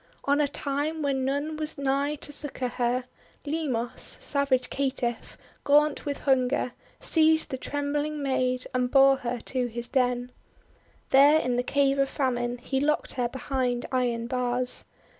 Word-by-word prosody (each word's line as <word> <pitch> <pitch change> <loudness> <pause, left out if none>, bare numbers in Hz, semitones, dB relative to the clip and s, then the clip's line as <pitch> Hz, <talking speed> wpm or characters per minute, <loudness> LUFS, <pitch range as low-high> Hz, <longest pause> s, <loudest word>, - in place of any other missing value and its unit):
On 285 +1 +3
a 290 - +2
time 290 +3 -2
w^hen 280 -1 +1
none 285 +4 -1
was 310 0 -3
nigh 280 +2 0
to 290 - -4
succour 275 -3 -2
her, 245 +1 0 0.4
Limos, 285 -6 -2
savage 275 -3 0
caitiff, 255 -4 -2 0.3
gaunt 295 +1 +3
with 285 - -3
hunger, 255 -1 +1 0.3
seized 320 -1 +3
the 260 - -2
trembling 290 +2 -2
maid 255 -2 0
and 250 -1 +1
bore 270 0 +6
her 245 -1 -3
to 255 -2 -2
his 235 0 -6
den. 250 -1 0 0.8
There 285 +3 +7
in 250 -4 -1
the 245 - +2
Cave 275 +1 +1
of 275 0 +2
Famine 245 -3 -1
he 265 +2 -2
locked 300 +2 0
her 245 -2 -1
behind 250 -1 -2
iron 240 -3 0
bars. 250 0 0
270 Hz, 150 wpm, -27 LUFS, 250-285 Hz, 0.8 s, There